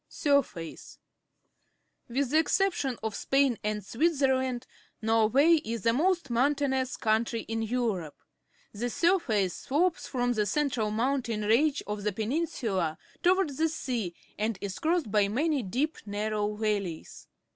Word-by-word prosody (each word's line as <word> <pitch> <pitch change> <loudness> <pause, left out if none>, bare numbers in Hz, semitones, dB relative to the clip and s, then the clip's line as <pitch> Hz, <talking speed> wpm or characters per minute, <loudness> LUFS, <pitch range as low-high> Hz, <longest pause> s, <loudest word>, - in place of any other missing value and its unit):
A - - -7
Norwegian 280 0 +6
Fiord - - -13
Sijrface. 165 -1 -9 0.6
— - - -47
With 280 -2 +2
the 310 - +5
exception 320 - +1
of 220 -1 -2
Spain 270 0 +1
and 210 -1 -2
Switzerland, 260 -2 +1 0.3
Norway 225 +9 +4
is 225 -2 -4
the 230 - +3
most 340 0 +1
moun 265 +5 +3
tainous 265 -2 -1
country 225 +1 +1
in 225 0 -3
Europe. 220 -9 -1 0.6
The 235 +4 -2
.surface 235 - +2
slopes 330 +6 0
from 245 -2 0
the 210 -2 0
central 250 -3 0
mountain 235 -1 -1
range 275 +8 +2
of 210 0 -4
the 210 +1 0
peninsula 215 - -1 0.2
toward 370 -1 +3
the 320 +3 +1
sea 240 - -3 0.2
and 215 -1 0
is 195 -1 -5
crossed 320 - 0
by 205 -1 +3
many 285 +7 0
deep, 255 +10 -2
narrow 210 0 -1
valleys. 205 -6 -3
240 Hz, 145 wpm, -29 LUFS, 210-285 Hz, 0.6 s, Norwegian